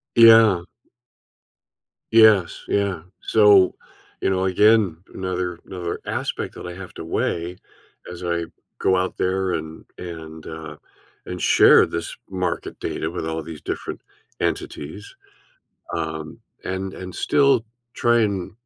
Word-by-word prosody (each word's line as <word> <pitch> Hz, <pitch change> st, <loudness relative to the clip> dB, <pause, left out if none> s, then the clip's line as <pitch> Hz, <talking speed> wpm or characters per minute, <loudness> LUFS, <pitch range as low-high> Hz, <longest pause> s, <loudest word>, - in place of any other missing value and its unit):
Yeah. 115 Hz, -6 st, +7 dB, 1.5 s
Yes, 110 Hz, -6 st, +5 dB
yeah, 100 Hz, -5 st, 0 dB, 0.2 s
so, 105 Hz, -4 st, +5 dB, 0.5 s
you -, -, +1 dB
know, 95 Hz, 0 st, +1 dB
again, 105 Hz, -2 st, +4 dB, 0.2 s
another 90 Hz, -2 st, -3 dB
another 90 Hz, -2 st, -5 dB
aspect -, -, -3 dB
that -, -, -8 dB
I 90 Hz, -, -6 dB
have 95 Hz, 0 st, -10 dB
to -, -, -7 dB
weigh 85 Hz, +2 st, -2 dB, 0.5 s
as 90 Hz, 0 st, -8 dB
I 85 Hz, -1 st, -1 dB, 0.3 s
go 95 Hz, -, +3 dB
out 90 Hz, 0 st, -1 dB
there 95 Hz, 0 st, 0 dB
and 80 Hz, 0 st, -5 dB
and, 80 Hz, -2 st, -8 dB
uh 80 Hz, -1 st, -8 dB, 0.5 s
and 90 Hz, -1 st, -6 dB
share -, -, +6 dB
this 85 Hz, 0 st, -5 dB
market 90 Hz, -2 st, -3 dB
data 80 Hz, -, -3 dB
with 85 Hz, -2 st, -5 dB
all 80 Hz, 0 st, -3 dB
these 80 Hz, -1 st, -9 dB
different -, -, -5 dB, 0.4 s
entities, 80 Hz, +8 st, -4 dB, 0.8 s
um, 80 Hz, -1 st, -4 dB, 0.3 s
and 95 Hz, 0 st, -3 dB
and 90 Hz, -1 st, -8 dB
still 140 Hz, -5 st, +3 dB, 0.3 s
try 120 Hz, -1 st, +3 dB
and 100 Hz, -4 st, -2 dB
90 Hz, 125 wpm, -22 LUFS, 85-100 Hz, 1.5 s, Yeah